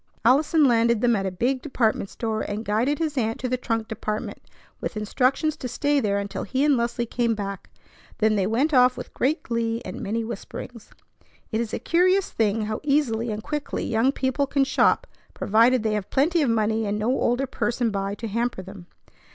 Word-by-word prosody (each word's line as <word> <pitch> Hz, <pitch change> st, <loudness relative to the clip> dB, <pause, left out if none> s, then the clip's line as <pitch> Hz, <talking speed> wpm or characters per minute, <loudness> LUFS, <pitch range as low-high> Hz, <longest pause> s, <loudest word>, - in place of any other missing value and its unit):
Allison 295 Hz, +5 st, +4 dB
landed 235 Hz, -2 st, +3 dB
them 240 Hz, -1 st, +3 dB
at 195 Hz, -2 st, -1 dB
a -, -, -2 dB
big 250 Hz, +8 st, 0 dB
department 225 Hz, -8 st, 0 dB
store, 220 Hz, -2 st, -3 dB
and 210 Hz, +2 st, -4 dB
guided 235 Hz, +8 st, +1 dB
his 300 Hz, -3 st, -1 dB
aunt 225 Hz, -1 st, -1 dB
to 255 Hz, -, -2 dB
the 255 Hz, -, 0 dB
trunk 225 Hz, -3 st, -2 dB
department 215 Hz, 0 st, -4 dB, 0.4 s
with -, -, -4 dB
instructions 260 Hz, +8 st, +1 dB
to 255 Hz, -, -5 dB
stay 290 Hz, +4 st, +1 dB
there 200 Hz, -5 st, 0 dB
until 200 Hz, 0 st, -4 dB
he 265 Hz, +1 st, -1 dB
and 295 Hz, -2 st, +4 dB
Leslie 235 Hz, 0 st, -1 dB
came 235 Hz, 0 st, 0 dB
back. 200 Hz, -2 st, -6 dB, 0.5 s
Then 215 Hz, 0 st, +2 dB
they 195 Hz, -2 st, +1 dB
went 265 Hz, +8 st, +1 dB
off 250 Hz, -1 st, +5 dB
with -, -, -8 dB
great 300 Hz, +6 st, 0 dB
glee 230 Hz, -1 st, -1 dB
and 185 Hz, -, -6 dB
many 225 Hz, +3 st, -2 dB
whisperings. 230 Hz, +1 st, -8 dB, 0.6 s
It 220 Hz, 0 st, 0 dB
is 230 Hz, -, -4 dB
a -, -, -2 dB
curious 370 Hz, +3 st, +2 dB
thing 220 Hz, 0 st, +1 dB
how 215 Hz, 0 st, -3 dB
easily 275 Hz, -6 st, +1 dB
and 215 Hz, 0 st, -4 dB
quickly 295 Hz, -1 st, -3 dB
young 230 Hz, +4 st, +2 dB
people 275 Hz, +1 st, -1 dB
can 275 Hz, 0 st, +2 dB
shop 270 Hz, -, +2 dB, 0.3 s
provided 230 Hz, +3 st, +3 dB
they 220 Hz, -1 st, 0 dB
have 210 Hz, -2 st, -3 dB
plenty 325 Hz, +5 st, +2 dB
of 280 Hz, -, +2 dB
money 220 Hz, -1 st, +1 dB
and 205 Hz, +1 st, -1 dB
no 215 Hz, +3 st, -1 dB
older 255 Hz, 0 st, +1 dB
person 240 Hz, -2 st, -1 dB
by 195 Hz, 0 st, -2 dB
to 230 Hz, -, -6 dB
hamper 230 Hz, -2 st, -2 dB
them. 190 Hz, -2 st, -11 dB
230 Hz, 200 wpm, -24 LUFS, 215-265 Hz, 0.6 s, off